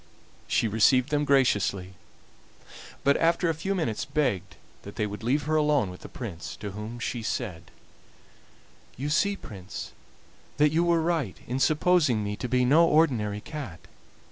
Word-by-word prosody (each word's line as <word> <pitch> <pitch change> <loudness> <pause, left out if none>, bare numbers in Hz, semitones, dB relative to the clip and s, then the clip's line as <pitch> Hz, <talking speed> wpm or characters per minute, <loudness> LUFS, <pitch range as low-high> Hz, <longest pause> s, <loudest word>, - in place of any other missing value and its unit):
She - - +1
received 115 +4 +3
them 150 0 +1
graciously, 100 -9 +2 1.1
but 140 0 +4
after 170 +1 +2
a - - +2
few 190 +6 -2
minutes 140 - -1
begged 125 - -1 0.3
that 100 - -10
they 105 - 0
would 105 +1 -6
leave 135 +6 +1
her 155 +1 0
alone 150 -10 +2
with 90 - -11
the - - -10
Prince, 85 -8 -7
to 100 +3 -6
whom 105 +4 -7
she 120 0 -3
said: 95 -8 -4 1.3
"You 140 +4 -3
see, 200 +7 +2
Prince, 100 - -8 0.7
that 150 0 +4
you 165 +2 +2
were 170 -1 +2
right 160 - -1
in 125 +2 -3
supposing 155 - +3
me 105 0 -3
to 125 - -4
be 125 0 +2
no 160 +6 +5
ordinary 115 -11 +2
cat. 130 - -7
125 Hz, 160 wpm, -27 LUFS, 105-155 Hz, 1.3 s, no